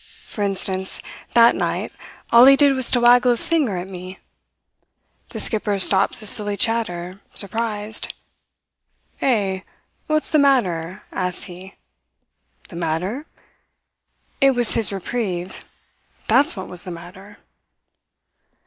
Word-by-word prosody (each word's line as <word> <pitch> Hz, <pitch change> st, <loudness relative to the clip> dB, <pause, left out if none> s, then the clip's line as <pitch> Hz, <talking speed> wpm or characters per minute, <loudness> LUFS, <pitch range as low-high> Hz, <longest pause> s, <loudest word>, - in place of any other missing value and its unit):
For 210 Hz, -, -6 dB
instance, 190 Hz, -1 st, -2 dB, 0.4 s
that 235 Hz, 0 st, +6 dB
night, -, -, -3 dB, 0.4 s
all 235 Hz, +1 st, +7 dB
he 275 Hz, +1 st, +7 dB
did 280 Hz, 0 st, +4 dB
was 260 Hz, -2 st, -2 dB
to 245 Hz, -, +2 dB
waggle 245 Hz, +1 st, +4 dB
his 235 Hz, -, +4 dB
finger 290 Hz, -, 0 dB
at 175 Hz, +1 st, -6 dB
me. 185 Hz, 0 st, -10 dB, 1.1 s
The -, -, -8 dB
skipper 210 Hz, -2 st, +1 dB
stops 195 Hz, +3 st, +4 dB
his 215 Hz, -, +5 dB
silly 205 Hz, -1 st, +2 dB
chatter, 190 Hz, -4 st, -1 dB
surprised. 215 Hz, +1 st, -3 dB, 1.1 s
"'Eh? 200 Hz, -7 st, 0 dB, 0.5 s
What's 310 Hz, 0 st, -1 dB
the 310 Hz, -, +3 dB
matter?' 195 Hz, -, 0 dB
asks 180 Hz, -1 st, -3 dB
he. 185 Hz, +1 st, -11 dB, 0.9 s
"The 170 Hz, -, -10 dB
matter! 180 Hz, -, -4 dB, 1.1 s
It 270 Hz, -1 st, +4 dB
was 240 Hz, -2 st, +5 dB
his 225 Hz, -3 st, +1 dB
reprieve 190 Hz, -2 st, -5 dB, 0.6 s
that's 285 Hz, +1 st, +2 dB
what 190 Hz, -2 st, -7 dB
was 180 Hz, -1 st, -4 dB
the 185 Hz, -, -8 dB
matter. 185 Hz, +4 st, -12 dB
205 Hz, 120 wpm, -20 LUFS, 185-240 Hz, 1.1 s, all